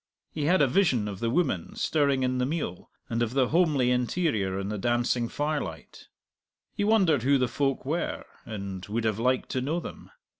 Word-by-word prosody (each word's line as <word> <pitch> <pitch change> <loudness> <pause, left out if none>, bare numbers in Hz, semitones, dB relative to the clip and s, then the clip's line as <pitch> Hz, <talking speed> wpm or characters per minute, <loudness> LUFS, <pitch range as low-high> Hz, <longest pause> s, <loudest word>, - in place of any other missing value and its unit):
He 150 -2 -3
had 175 0 +4
a - - +4
vision 130 - +2
of 100 -2 -6
the 115 - 0
woman 130 - 0
stirring 140 -4 +1
in 130 0 0
the 125 - +2
meal, 145 - -4 0.2
and 115 0 -2
of 120 +2 -1
the 130 -3 +3
homely 150 -7 +3
interior 125 - 0
in 100 +1 -3
the 105 -1 -3
dancing 120 +1 +1
firelight. 145 - -4 0.7
He 205 - -2
wondered 195 - +3
who 140 +3 +3
the 130 -1 +1
folk 135 +2 -1
were, 160 +5 -2 0.2
and 100 -4 -6
would 110 +3 -2
have 110 -1 0
liked 125 +2 +1
to 130 - -1
know 155 +7 -1
them. - - -9
130 Hz, 190 wpm, -27 LUFS, 115-150 Hz, 0.7 s, had